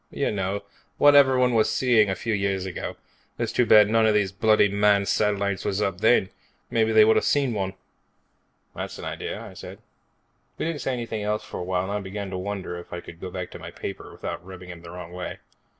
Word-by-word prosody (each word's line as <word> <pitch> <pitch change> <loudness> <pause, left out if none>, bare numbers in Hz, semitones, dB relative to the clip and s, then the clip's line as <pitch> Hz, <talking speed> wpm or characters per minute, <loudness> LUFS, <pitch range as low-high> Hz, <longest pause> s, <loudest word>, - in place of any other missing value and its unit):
"You - - -1
know, 100 0 -2 0.3
what 145 0 +6
everybody 130 -3 +5
was 110 -1 +3
seeing 115 -5 +3
a 95 - 0
few 115 +2 -2
years 100 -2 -1
ago. 95 - -5 0.4
It's - - -2
too 125 - +2
bad 105 0 +6
one 115 -1 +4
of 110 - +3
these 100 -3 +2
bloody 105 +1 +4
manned 100 0 +3
satellites 100 -2 0
wasn't 100 0 0
up 90 - -17
then. 110 -4 +4 0.4
Maybe 110 -1 +2
they 110 -1 +7
would've 110 - +4
seen 140 -4 +2
one." 95 -2 -3 1.0
"That's - - -5
an - - -7
idea," - - -5
I - - -10
said. - - -9 0.8
We - - -2
didn't 160 -4 -3
say 130 +1 -1
anything 115 -3 -4
else 105 +1 -1
for - - -7
a - - -3
while 90 0 -1
and 95 - -4
I 105 - -1
began 100 0 -6
to 95 - -3
wonder 95 -2 -4
if 85 - -13
I 90 - -4
could 85 -1 -12
go 95 - -5
back 90 -1 -6
to - - -9
my - - -8
paper - - -7
without - - -6
rubbing 90 -1 -10
him 85 -1 -11
the 85 - -11
wrong 90 -1 -8
way. 90 0 -6
100 Hz, 225 wpm, -25 LUFS, 95-110 Hz, 1.0 s, they